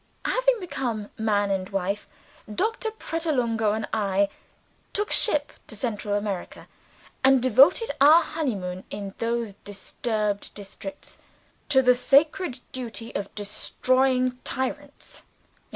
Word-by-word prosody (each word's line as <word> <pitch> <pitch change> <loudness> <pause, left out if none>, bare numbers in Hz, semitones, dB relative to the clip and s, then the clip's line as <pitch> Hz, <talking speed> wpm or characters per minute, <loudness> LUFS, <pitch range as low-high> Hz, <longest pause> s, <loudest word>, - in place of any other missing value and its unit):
Having - - +2
become 245 - -4
man 205 -2 +1
and 190 -1 -2
wife, 195 +1 -2 0.4
Doctor 445 - -1
Pratolungo 255 - -1
and 215 -1 -3
I 200 -2 +1 0.6
took 415 +1 -1
ship 300 -10 +4
to - - -6
Central 210 -2 -2
America 205 -3 -4 0.6
and 265 0 +6
devoted 270 - +5
our 310 +4 +8
honey 310 -7 -2
moon, 180 -1 -5
in 200 -1 -6
those 230 -2 -1
disturbed 205 +1 -3
districts, 210 +8 -9 0.5
to 265 -2 +5
the 250 0 +6
sacred 275 +3 +2
duty 235 -2 -6
of 200 0 -5
destroying 255 +4 +1
tyrants. 285 +2 -4
235 Hz, 115 wpm, -25 LUFS, 205-285 Hz, 0.6 s, our